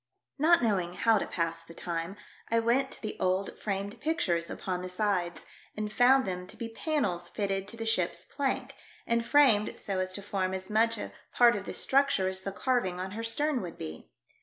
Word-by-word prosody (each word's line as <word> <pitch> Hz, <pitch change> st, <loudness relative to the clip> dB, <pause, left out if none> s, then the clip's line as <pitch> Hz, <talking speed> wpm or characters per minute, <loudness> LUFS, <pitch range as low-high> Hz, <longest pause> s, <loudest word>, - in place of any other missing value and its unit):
Not 330 Hz, 0 st, +5 dB
knowing 185 Hz, -6 st, +1 dB
how 225 Hz, +2 st, +4 dB
to -, -, -3 dB
pass 165 Hz, -1 st, -2 dB
the 165 Hz, 0 st, -13 dB
time, 170 Hz, +3 st, -4 dB, 0.3 s
I 230 Hz, -, +3 dB
went 245 Hz, +4 st, +2 dB
to -, -, -9 dB
the 215 Hz, -, -3 dB
old, 185 Hz, +2 st, 0 dB
framed 200 Hz, 0 st, -3 dB
pictures 185 Hz, -, 0 dB
upon 180 Hz, -1 st, -3 dB
the 185 Hz, -, -5 dB
sides, 180 Hz, -2 st, -1 dB, 0.3 s
and 210 Hz, 0 st, -3 dB
found 260 Hz, +3 st, +5 dB
them 180 Hz, -1 st, -4 dB
to -, -, -11 dB
be 230 Hz, -, -4 dB
panels 225 Hz, -, -1 dB
fitted 195 Hz, -2 st, -2 dB
to 230 Hz, -, -5 dB
the 225 Hz, -, -4 dB
ship's 205 Hz, -6 st, 0 dB
plank, 275 Hz, -1 st, -2 dB, 0.3 s
and 235 Hz, 0 st, +1 dB
framed 240 Hz, -5 st, +4 dB
so 195 Hz, -2 st, -3 dB
as 185 Hz, 0 st, -1 dB
to 200 Hz, -, -6 dB
form 190 Hz, -2 st, -1 dB
as 190 Hz, +2 st, -7 dB
much 230 Hz, +1 st, +3 dB
a -, -, -6 dB, 0.2 s
part 240 Hz, -2 st, +6 dB
of 200 Hz, -1 st, -4 dB
the -, -, -4 dB
structure 275 Hz, -8 st, +2 dB
as 190 Hz, 0 st, +1 dB
the 195 Hz, -, -4 dB
carving 200 Hz, -5 st, 0 dB
on 185 Hz, +1 st, -4 dB
her 225 Hz, +3 st, -5 dB
stern 290 Hz, +4 st, +1 dB
would 175 Hz, -3 st, -7 dB
be. 80 Hz, 0 st, -8 dB
200 Hz, 205 wpm, -30 LUFS, 185-235 Hz, 0.3 s, part